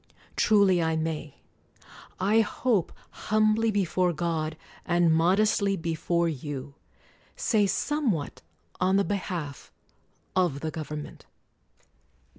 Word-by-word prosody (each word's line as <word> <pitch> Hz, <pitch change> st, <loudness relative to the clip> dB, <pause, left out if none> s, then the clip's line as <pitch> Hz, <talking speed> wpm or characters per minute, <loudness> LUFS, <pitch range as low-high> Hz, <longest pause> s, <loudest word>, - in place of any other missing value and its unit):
Truly 200 Hz, -5 st, +4 dB
I 160 Hz, 0 st, +1 dB
may 160 Hz, -2 st, -3 dB, 0.4 s
— -, -, -18 dB
I 205 Hz, +4 st, +3 dB
hope, 220 Hz, -4 st, 0 dB, 0.4 s
humbly 215 Hz, +1 st, +3 dB
before 185 Hz, -3 st, +1 dB
God, 160 Hz, -1 st, -2 dB, 0.3 s
and 175 Hz, -2 st, +3 dB
modestly 195 Hz, +4 st, +2 dB
before 170 Hz, +1 st, 0 dB
you 145 Hz, -2 st, -5 dB, 0.3 s
— -, -, -30 dB, 0.2 s
say 210 Hz, -3 st, +2 dB
somewhat 225 Hz, -, -1 dB, 0.4 s
on 185 Hz, +1 st, +2 dB
the 200 Hz, -, +4 dB
behalf 175 Hz, -8 st, -4 dB, 0.6 s
of 175 Hz, -7 st, +1 dB
the 160 Hz, -, -3 dB
government. 150 Hz, -1 st, -7 dB
175 Hz, 105 wpm, -27 LUFS, 160-200 Hz, 0.6 s, Truly